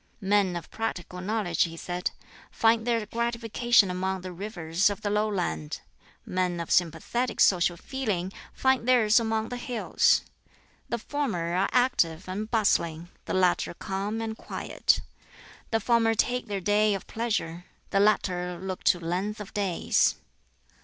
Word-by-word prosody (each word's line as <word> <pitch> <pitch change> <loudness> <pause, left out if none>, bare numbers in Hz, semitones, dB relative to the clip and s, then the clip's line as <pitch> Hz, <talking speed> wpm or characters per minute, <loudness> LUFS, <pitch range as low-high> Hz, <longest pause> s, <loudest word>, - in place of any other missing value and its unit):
"Men 195 -3 +2
of 170 -2 -7
practical 180 -5 -4
knowledge," 195 -4 -1
he 165 0 -8
said, 180 +2 -3 0.4
"find 225 0 +2
their 230 -2 +1
gratification 235 -2 +2
among 190 +1 -2
the 185 0 -6
rivers 180 -1 0
of 205 +1 -5
the 205 - 0
lowland, 195 - -1 0.4
men 180 -1 -1
of 170 - -5
sympathetic 180 +9 0
social 175 -2 +4
feeling 200 -7 -3 0.2
find 260 -2 +1
theirs 235 -3 +5
among 220 -1 -1
the 245 - -4
hills. 245 -2 +2 0.7
The 235 - -1
former 215 -10 -2
are 190 +2 +2
active 195 -10 +2
and 205 +4 -4
bustling, 175 -7 +1 0.2
the - - -2
latter 180 -2 +2
calm 205 +4 -3
and 220 -1 -3
quiet. - - 0 0.7
The 225 - +1
former 225 -1 +2
take 245 +2 0
their 200 -2 -3
day 210 +2 +3
of 195 - -6
pleasure, 195 -7 -3 0.3
the 195 - +3
latter 180 -4 +1
look 190 0 -5
to 175 - +4
length 185 +6 -2
of 210 - -8
days." 200 -5 +2
205 Hz, 145 wpm, -27 LUFS, 180-225 Hz, 0.7 s, theirs